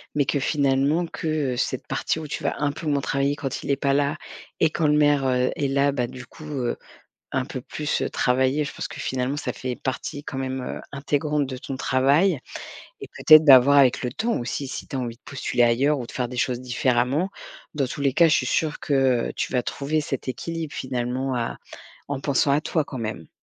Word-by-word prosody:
mais 145 - +3
que 145 - 0
finalement 140 +3 +2
que, 165 - -6 0.3
heu, 120 - -5
cette - - -2
partie - - -1
où 155 - -6
tu 150 - -5
vas 140 - 0
un 145 -1 +1
peu 155 +2 -7
moins 145 -1 +1
travailler 140 +1 0
quand 135 -3 -4
il - - -6
est - - +3
pas 140 0 0
là 145 +2 +1 0.5
et 160 - +5
quand 155 0 0
le 150 - +4
maire, 145 -2 +3
heu, 125 0 +2
est 145 - 0
là, 140 +1 +2
bah, 125 -3 -1
du 125 +1 -10
coup, 155 +5 -13
heu, 135 -5 -2 0.6
un 130 -1 0
peu 130 -3 -6
plus, 150 +3 -3
heu, - - -1
travailler. 130 +3 +1
Je - - -6
pense - - -5
que 150 - -9
finalement 130 +2 -2
ça 125 -4 -3
fait 125 +4 -4
partie 135 +2 -4
quand 135 - -5
même, 130 0 -3
heu, - - -5
intégrante 145 +1 0
de 130 - -5
ton 135 0 -6
travail 140 +7 +3 0.6
et - - -8
peut-être 155 0 +8
d'avoir, 140 0 +8
avec 130 -3 +4
le 125 -1 -2
temps 230 - -1
aussi, 130 +3 -4
si - - -6
tu - - -9
as 135 - -1
envie 120 -2 -4
de - - -42
postuler 125 -3 0
ailleurs 135 +5 +2
ou 120 - -5
de - - -11
faire 125 -2 -2
des 125 - -8
choses 125 +1 0
différemment, 125 +5 +1 0.5
dans 135 -3 0
tous 145 - -6
les 140 -2 +2
cas 170 +3 +5
je 155 - +4
suis - - -1
sûre 155 -2 0
que, - - -4 0.4
heu, - - -6
tu - - -3
vas 125 -2 +1
trouver 150 +3 -1
cet 135 -3 -4
équilibre 165 +3 -4
finalement 130 +1 -2
à 120 -1 -2 0.5
en 140 -1 -3
pensant 140 +1 +1
à 145 +2 +2
toi 160 -2 0
quand 135 - -8
même. 110 -9 -5
135 Hz, 235 wpm, -24 LUFS, 125-145 Hz, 0.6 s, peut-être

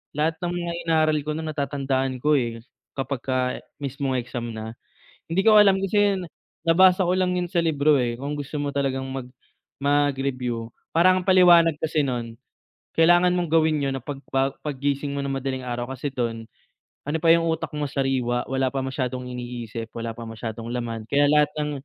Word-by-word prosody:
lahat 160 +2 0
ng 175 0 -2
mga 175 -1 -3 0.2
inaaral 155 -1 +3
ko 150 +1 -6
no'n 160 0 -4
natatandaan 135 -2 -1
ko, 150 -1 +4
eh, 115 -2 -4 0.3
kapagka 130 -1 -2 0.2
mismong 135 -1 -2
exam 120 -2 -5
na. 110 0 -6 0.6
Hindi 175 +4 0
ko 215 0 +7
alam, 200 -2 +6
kasi 195 +2 0 0.2
'yan, 190 - -4 0.4
nabasa 185 +3 +5
ko 180 - +1
lang 185 -1 +1
'yun 175 -1 -2
sa 175 - +2
libro, 150 -3 +3
eh, 120 -1 -1
kung 140 +4 -4
gusto 145 +1 -6
mo 145 - -2
talagang 135 -1 -1
mag 130 -2 -5 0.6
mag-review 135 -5 0 0.2
parang 185 +2 +5
ang 180 - -7
paliwanag 175 -3 +6
kasi 155 -2 +1
no'n, 115 -3 -4 0.6
kailangan 175 +2 +5
mong 175 -3 -2
gawin 155 -2 +3
'yun 135 - -1
na 135 - -4
pagba 135 0 -2
paggising 140 0 -2
mo 140 - -2
ng 140 - -3
madaling 130 -1 -3
araw, 120 +1 -3
kasi 135 +3 -4
do'n, 115 -4 -3 0.6
ano 155 - 0
pa 165 +1 +5
'yung 165 0 +2
utak 160 0 -2
mo 150 -1 -2
sariwa, 130 -3 0
wala 130 0 0
pa 135 0 -3
masyadong 130 -2 -3
iniisip, 120 -2 -6
wala 115 0 -4
pa 115 0 -8
masyadong 115 0 -6
laman, 115 -2 -4
kaya 145 +1 +4
lahat 150 -1 +4
ng 150 0 -1
140 Hz, 180 wpm, -24 LUFS, 125-160 Hz, 0.6 s, ko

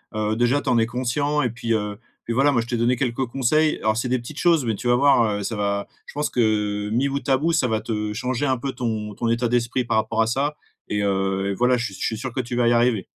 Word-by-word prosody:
heu, 110 0 0
déjà, 120 +5 +2
tu - - -3
en 120 - +3
es 115 - +3
conscient 140 +5 0
et 125 - +1
puis, 115 0 -2
heu 105 -1 -2 0.2
puis 115 - -3
voilà. 135 +4 +4
Moi, 120 -4 +2
je - - -6
t'ai 120 - -2
donné 120 +2 +2
quelques 125 0 -1
conseils. 150 +5 +1
Alors 110 0 +1
c'est 125 +2 -1
des 130 - +2
petites 125 +6 -8
choses 165 -6 +3
mais 115 - 0
tu 110 +5 -4
vas 120 - +4
voir, 140 0 +4 0.2
heu, - - -4
ça 110 - -3
va 100 -1 -1 0.2
je - - -11
pense 150 +1 -1
que 105 -3 0
mis 120 +6 +1
bout 140 +1 -3
à 135 - +5
bout, 160 +5 0
ça 130 - +2
va 110 -2 -1
te 105 -1 -3
changer 125 +4 -1
un 130 -1 +1
peu 135 +3 -3
ton 110 -5 -3
ton 115 +4 -3
état 120 +1 +1
d'esprit 120 +1 0
par 110 - 0
rapport 110 +1 +1
à - - -2
ça 140 +6 0 0.3
et 105 0 -1
heu 95 0 0
et - - -1
voilà. 125 +5 +2
Je 120 - -2
suis 100 - -5
je 95 - -6
suis 110 - -1
sûr 125 +1 -5
que 130 - -3
tu 120 0 -5
vas 120 -1 +2
y 120 - +4
arriver. 120 -4 +2
120 Hz, 290 wpm, -23 LUFS, 110-130 Hz, 0.3 s, à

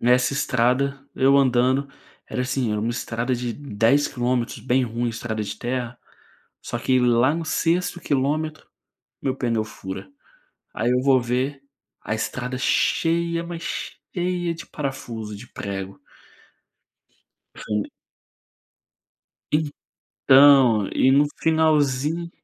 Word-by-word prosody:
nessa 125 +2 +3
estrada, 135 +1 +1
eu 135 +1 +4
andando, 130 +1 +3 0.4
era 125 - -2
assim 130 -3 -1
era 105 - -1
uma 115 +2 -1
estrada 120 +1 -2
de 120 -1 -3
10 140 +2 +1
quilômetros, 125 -2 -2
bem 130 0 +1
ruim, 120 +1 -2
estrada 110 -1 -4
de 100 - -5
terra, 120 -1 -3 0.6
só 120 - -4
que 130 +2 +2
lá 125 +4 +3
no 165 - -3
6º 175 +2 0
quilômetro, 155 +3 -1 0.6
meu 130 -1 -1
pneu 115 -4 0
fura, 95 - -8 0.6
aí 120 +2 0
eu 125 - +2
vou 135 -2 +4
ver, 130 +3 -2 0.4
a 110 - -2
estrada 125 +3 -3
cheia, 170 +5 +1
mas 170 -1 -7 0.5
cheia, 175 -1 -1
de 165 - -9
parafuso, 115 -7 -5
de 110 +5 -10
prego. 100 -3 -6 1.6
Fui. 105 -1 -2 2.2
Então, 135 -6 +6
e 130 - +4
no 140 +2 +5 0.2
finalzinho 155 0 +2
130 Hz, 120 wpm, -23 LUFS, 120-145 Hz, 2.2 s, Então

